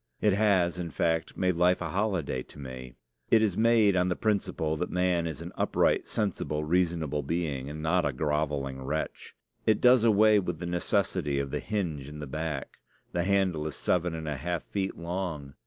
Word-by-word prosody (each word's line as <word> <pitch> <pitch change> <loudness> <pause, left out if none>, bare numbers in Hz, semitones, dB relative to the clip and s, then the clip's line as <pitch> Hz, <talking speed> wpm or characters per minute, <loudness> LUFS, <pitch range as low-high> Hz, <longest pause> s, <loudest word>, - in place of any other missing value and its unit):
It 105 -2 +3
has, 95 -4 +2
in 85 -1 -3
fact, 80 +1 -1
made 90 -1 +2
life 90 +1 +4
a 90 - -3
holiday 90 -8 -1
to - - -14
me. 65 -3 -8 0.3
It 110 -1 +5
is 100 -5 +1
made 110 -3 +4
on 90 0 +2
the 90 - 0
principle 100 -7 0
that 90 - -2
man 90 -2 +1
is 80 -3 -6
an - - -7
upright, - - +1
sensible, 85 -7 -2
reasonable 80 -3 0
being, 70 -3 -2
and 75 +1 -6
not 90 +3 +2
a 70 - +1
groveling 70 -1 -1
wretch. 75 +4 -4 0.3
It 110 -1 +4
does 125 -2 +6
away 110 -1 +5
with 90 -4 -3
the 85 - -6
necessity 75 -4 0
of 70 -1 -3
the - - -1
hinge 80 -10 -3
in 75 - -9
the 75 - -5
back. 75 0 -4 0.3
The 85 0 -1
handle 95 -6 +1
is 75 - -5
seven 90 -1 0
and 80 -1 -6
a 75 -2 -2
half 85 +4 -3
feet 95 -1 -3
long. 85 -5 -4
85 Hz, 190 wpm, -28 LUFS, 75-95 Hz, 0.3 s, does